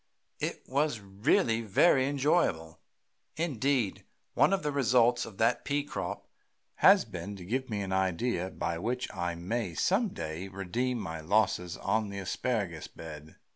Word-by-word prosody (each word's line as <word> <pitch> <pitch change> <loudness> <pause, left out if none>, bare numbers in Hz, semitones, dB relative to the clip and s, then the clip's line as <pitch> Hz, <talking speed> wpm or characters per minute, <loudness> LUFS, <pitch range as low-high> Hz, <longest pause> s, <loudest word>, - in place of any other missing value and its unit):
It - - -3
was 140 -2 0
really 105 +3 +1
very 130 - +4
enjoyable. 135 - +1 0.6
Indeed, 135 - 0 0.3
one - - +4
of 195 -1 +1
the 150 - 0
results 125 -2 +3
of 100 - -12
that 115 +2 +2
pea 145 0 0
crop 145 - -5 0.5
has - - +6
been 100 0 -6
to 90 -3 -10
give 130 +6 -2
me 105 -2 -2
an 95 -1 -3
idea 95 +1 0
by 85 -3 -3
which 125 +6 -2
I 85 -3 -2
may 90 +1 -3
some 195 - +2
day 80 - -5
redeem 100 +7 -2
my 80 -6 -5
losses 90 0 +1
on 110 -1 0
the 100 - -6
asparagus 100 -3 -2
bed. 80 -1 -10
110 Hz, 150 wpm, -30 LUFS, 90-130 Hz, 0.6 s, has